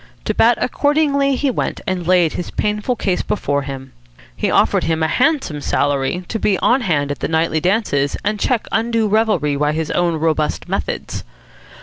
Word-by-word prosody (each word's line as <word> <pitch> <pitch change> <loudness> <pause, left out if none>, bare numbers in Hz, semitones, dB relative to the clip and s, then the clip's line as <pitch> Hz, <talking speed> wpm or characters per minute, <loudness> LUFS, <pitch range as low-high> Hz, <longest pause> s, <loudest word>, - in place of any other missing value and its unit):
To - - 0
Bat 235 +1 +4
accordingly 280 0 +1
he 275 +1 0
went, - - -2
and 180 -3 -2
laid 180 -3 +3
his 175 - -4
painful 210 +4 -1
case 190 -5 -1
before 140 -8 -1
him. 135 -1 -8 0.4
He - - -1
offered - - +2
him 160 0 0
a - - +3
handsome 255 - 0
salary 145 +6 0
to 225 - -3
be 200 -2 +1
on 255 +7 +2
hand 145 -9 0
at 145 - -5
the - - -2
nightly 160 0 +1
dances 165 -7 0
and 210 0 0
check 245 0 0
undue 225 -1 +1
revelry 205 -9 +1
by 150 +1 +1
his 160 0 -2
own 175 -1 +1
robust 155 -1 -1
methods. - - -3
180 Hz, 180 wpm, -18 LUFS, 150-225 Hz, 0.4 s, Bat